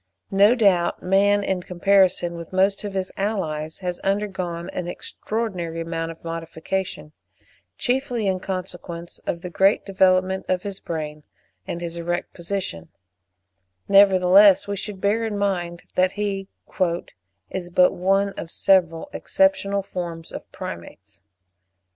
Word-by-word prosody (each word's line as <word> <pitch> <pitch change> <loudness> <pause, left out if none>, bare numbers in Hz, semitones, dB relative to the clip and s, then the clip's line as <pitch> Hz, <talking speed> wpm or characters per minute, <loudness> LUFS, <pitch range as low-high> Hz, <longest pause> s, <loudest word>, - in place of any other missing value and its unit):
No 200 +4 +5
doubt 190 -7 +2
man, 200 +2 +3
in 190 -2 -1
comparison 180 -1 +2
with 170 -1 -8
most 195 +2 +2
of 200 -1 -5
his 190 -1 -2
allies, 160 -6 -2
has 180 -1 -3
undergone 190 -4 -2
an 180 - -4
extraordinary 180 -3 -4
amount 165 0 -3
of 165 - -10
modification, 165 0 -4 0.7
chiefly 250 -3 0
in 190 -1 +1
consequence 180 -2 -6
of 170 - -2
the 180 - -7
great 195 +4 +3
development 190 -1 +2
of 180 -1 0
his 200 -1 -5
brain 155 -2 -5 0.5
and 170 - -4
his 170 0 -5
erect 175 +1 -3
position; 170 - -4 1.0
nevertheless, 195 0 +6
we 200 - -2
should 200 -1 -6
bear 210 +4 +2
in 215 -2 -2
mind 175 -4 -1
that 185 0 +2
he 200 -1 -2 1.0
"is 175 -2 -4
but 180 +1 +4
one 195 +2 +2
of 170 -4 -7
several 170 - +2
exceptional 200 -9 +1
forms 170 -3 -6
of - - -9
Primates." 90 +2 -9
185 Hz, 130 wpm, -23 LUFS, 170-200 Hz, 1.0 s, nevertheless